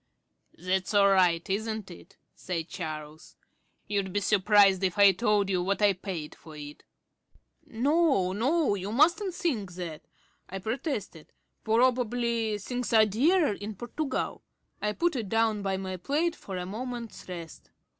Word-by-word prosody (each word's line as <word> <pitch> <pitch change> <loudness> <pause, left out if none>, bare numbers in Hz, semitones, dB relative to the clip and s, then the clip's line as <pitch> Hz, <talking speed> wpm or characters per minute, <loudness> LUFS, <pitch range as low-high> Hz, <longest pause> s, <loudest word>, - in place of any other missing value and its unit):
"That's 185 +3 -1
all 200 -1 +6
right, 180 -3 +3
isn't 215 0 -3
it?" 180 +3 -14 0.2
said 170 -3 -4
Charles. 155 -1 -7 0.5
"You'd 200 -2 -1
be 205 - 0
surprised 200 -1 +4
if 185 -1 0
I 200 -1 +8
told 205 0 +1
you 185 -2 0
what 195 +2 -1
I 205 -1 +4
paid 180 -5 -6
for 160 -2 -14
it." 145 0 -10 0.8
"No, 275 - +2
no, 270 - +1
you 200 +1 -4
mustn't 345 - +3
think 230 - -2
that," 170 -3 -6 0.5
I 195 - -5
protested. 220 - -4 0.3
"Probably 235 -1 +1
things 245 +4 -4
are 220 -1 +7
dearer 290 - +2
in 205 +1 -7
Portugal." 260 +6 -3 0.4
I 210 0 0
put 340 +5 0
it 225 -6 -3
down 225 -1 +1
by 195 -1 -1
my 190 -1 -5
plate 310 - 0
for 190 -2 -7
a 180 - -4
moment's 235 +1 -6
rest. 170 -3 -9
205 Hz, 145 wpm, -28 LUFS, 185-240 Hz, 0.8 s, I